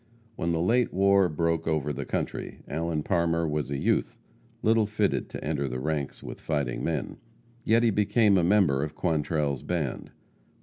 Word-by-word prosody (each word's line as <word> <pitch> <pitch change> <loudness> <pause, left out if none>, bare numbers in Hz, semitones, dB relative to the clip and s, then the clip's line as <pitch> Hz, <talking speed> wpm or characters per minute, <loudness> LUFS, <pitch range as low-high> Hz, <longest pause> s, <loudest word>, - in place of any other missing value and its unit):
When 85 - -1
the 80 - 0
late 120 +7 +2
war 100 -1 +4
broke 85 +1 -1
over 75 -2 0
the 70 0 -5
country, - - -4
Allen 80 +1 -2
Parmer 85 -2 +1
was 75 -2 -2
a 70 - -2
youth, - - 0 0.5
little 110 -1 +3
fitted 105 -1 0
to - - -7
enter 75 -2 -1
the 65 0 -4
ranks 75 -1 -3
with - - -8
fighting 70 -6 -2
men. - - -2 0.5
Yet 115 +2 +4
he 115 - +4
became 105 +1 +3
a 90 - +3
member 85 -8 +3
of 75 - -5
Quantrell's 75 -4 0
band. 80 -7 -3
85 Hz, 170 wpm, -27 LUFS, 75-100 Hz, 0.5 s, war